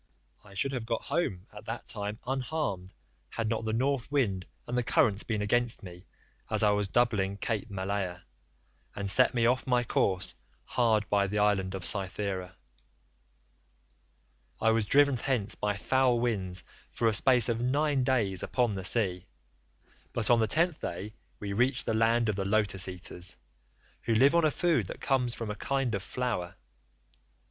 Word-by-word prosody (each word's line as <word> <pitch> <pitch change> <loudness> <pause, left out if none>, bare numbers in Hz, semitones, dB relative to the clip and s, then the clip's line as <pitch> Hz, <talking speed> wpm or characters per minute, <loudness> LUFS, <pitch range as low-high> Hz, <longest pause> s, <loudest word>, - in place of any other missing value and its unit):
I 100 -1 -15
should 135 +7 0
have 125 -4 -4
got 115 -1 -2
home 140 - -2
at 105 0 -11
that 115 +1 -5
time 105 0 -2
unharmed 130 - -3 0.4
had 115 -1 -3
not 110 0 -2
the 110 - -1
North 135 +2 0
wind 100 -11 0 0.2
and 120 - -4
the 125 - +2
currents 105 -3 +2
been 110 -2 -2
against 120 +2 0
me 90 0 -11 0.4
as - - +2
I 105 - +5
was 105 -1 0
doubling 100 -4 +1
Cape 110 +1 -2
Malea, 95 -2 -3 0.7
and 100 -1 -3
set 125 +6 +4
me 115 -1 +2
off 125 +3 +1
my 125 -1 +2
course 95 -5 0 0.3
hard 110 -4 +1
by 100 -1 +3
the 105 +2 -3
island 100 -2 +1
of 95 - -5
Cythera. 95 -2 -2 2.0
"I 115 - +3
was 110 -1 +1
driven 140 +3 +4
thence 120 -5 -1
by 105 -1 -2
foul 125 +4 +2
winds 95 -6 -2 0.3
for 115 - -1
a 110 - +3
space 125 +1 +5
of 115 0 -1
nine 140 +2 +1
days 110 -8 +2
upon 120 -4 0
the 95 -1 -5
sea, 95 -3 +1 0.9
but 115 0 +1
on 120 - +5
the 110 - +2
tenth 170 +5 +2
day 100 +5 -5 0.3
we 100 -1 -4
reached 125 +4 +1
the - - 0
land 115 +1 +2
of 105 - 0
the 100 - -2
Lotus 100 -2 +2
eaters, 90 0 -4 0.7
who 115 - +1
live 135 +7 +5
on 170 -1 +4
a - - +4
food 170 +2 +1
that - - -8
comes 125 -3 +1
from 115 -2 -4
a - - -5
kind 135 0 -1
of 100 - -1
flower. 115 -6 -3
110 Hz, 170 wpm, -29 LUFS, 100-125 Hz, 2.0 s, I